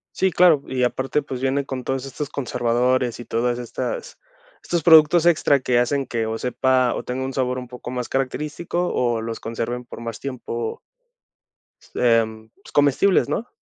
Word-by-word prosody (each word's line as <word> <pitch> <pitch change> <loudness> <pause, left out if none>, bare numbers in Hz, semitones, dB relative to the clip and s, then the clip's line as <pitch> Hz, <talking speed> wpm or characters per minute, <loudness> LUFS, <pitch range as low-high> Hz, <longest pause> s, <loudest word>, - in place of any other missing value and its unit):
Sí, 190 -1 +2
claro, 165 -6 +5
y 130 -1 -1
aparte, 130 +4 0
pues 130 -3 -6
viene 135 +1 0
con 130 -2 -5
todos 135 +1 -2
estos 145 +1 -5
conservadores 125 -1 0
y 120 - -8
todas 120 +2 -1
estas 465 - -5 0.5
estos 170 -2 -1
productos 160 +1 +6
extra 150 -4 +4
que 125 -1 +1
hacen 135 +2 0
que 115 -2 -1
o 110 0 -3
sepa 125 0 +2
o - - -4
tenga 130 +1 -3
un 135 - -4
sabor 130 -1 -1
un 125 - -8
poco 125 0 -8
más 125 -1 -4
característico 150 +6 -2
o 120 -2 0
los 115 0 -5
conserven 115 +2 -4
por 120 - -10
más 115 -2 -6
tiempo 120 -4 -5 1.2
em, 110 -2 +1
pues, - - -14
comestibles, 145 +7 +3
¿no? 235 - -2
130 Hz, 170 wpm, -22 LUFS, 120-140 Hz, 1.2 s, productos